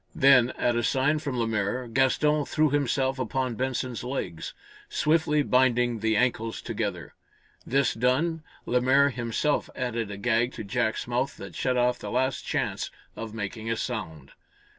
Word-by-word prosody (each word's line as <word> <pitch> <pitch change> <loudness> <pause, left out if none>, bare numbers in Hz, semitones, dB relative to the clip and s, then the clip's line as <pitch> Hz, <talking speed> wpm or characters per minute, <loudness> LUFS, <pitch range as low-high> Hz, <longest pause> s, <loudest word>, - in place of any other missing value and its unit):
Then, 130 -3 +6
at 120 -1 +1
a 120 - +1
sign 135 +5 +2
from 140 -4 -4
Lemaire, 115 +1 -1
Gaston 135 +5 +2
threw 155 -2 +1
himself 135 -1 +1
upon 130 +1 -1
Benson's 125 -1 -2
legs, 125 -10 -4 0.3
swiftly 150 -1 +2
binding 125 -3 +2
the 110 0 +1
ankles 115 -2 0
together. 100 -7 -4 0.5
This 135 +1 +2
done, 135 +8 +1 0.2
Lemaire 130 +3 +3
himself 125 +4 -1
added 120 -4 -2
a 100 - -6
gag 120 +3 +1
to - - -6
Jack's 110 +3 -1
mouth 125 +3 -1
that - - -9
shut 130 -1 0
off 125 0 +2
the - - -6
last 130 +2 0
chance - - -2 0.3
of 115 -1 -7
making 110 +1 -5
a 115 - 0
sound. 75 -9 -5
125 Hz, 150 wpm, -27 LUFS, 115-135 Hz, 0.5 s, Then